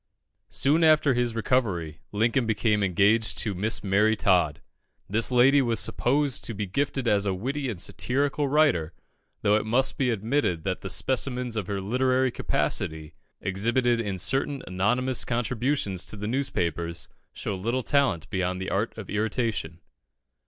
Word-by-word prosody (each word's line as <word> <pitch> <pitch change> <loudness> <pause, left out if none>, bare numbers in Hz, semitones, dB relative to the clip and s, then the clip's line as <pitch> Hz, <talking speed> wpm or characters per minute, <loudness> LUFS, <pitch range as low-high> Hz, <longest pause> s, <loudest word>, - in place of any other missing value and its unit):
Soon 150 +5 +2
after 155 -3 +5
his 120 -2 0
recovery, 100 - -1
Lincoln 115 +3 +1
became 110 -1 +1
engaged 100 +4 +2
to 105 - -1
Miss 105 +4 -1
Mary 105 +3 +3
Todd. 90 -9 +2 0.5
This 110 +5 -1
lady 130 +3 +5
was 115 -4 0
supposed 140 +1 +1
to 115 - -4
be 105 +1 -3
gifted 135 +5 -2
as 100 -2 +2
a 95 - 0
witty 135 +7 -3
and 105 -7 -5
satirical 140 - 0
writer, 135 - +2 0.5
though 105 0 +4
it - - -1
must 120 +5 +1
be 130 -2 +2
admitted 110 - 0
that 95 0 -2
the 95 - -6
specimens 125 +2 -1
of 105 -5 -3
her 100 -1 -2
literary 130 +5 +1
capacity, 80 -8 -2 0.3
exhibited 115 +5 +1
in 100 -4 -3
certain 135 +8 0
anonymous 125 +8 0
contributions 120 -4 -1
to - - -3
the 105 +1 -4
newspapers, 85 - -2 0.2
show - - -4
little 115 +7 -2
talent 135 - +1
beyond 90 -1 -1
the 95 - -4
art 105 +4 -1
of 105 -4 -7
irritation. 105 -4 -2
115 Hz, 150 wpm, -26 LUFS, 95-130 Hz, 0.5 s, after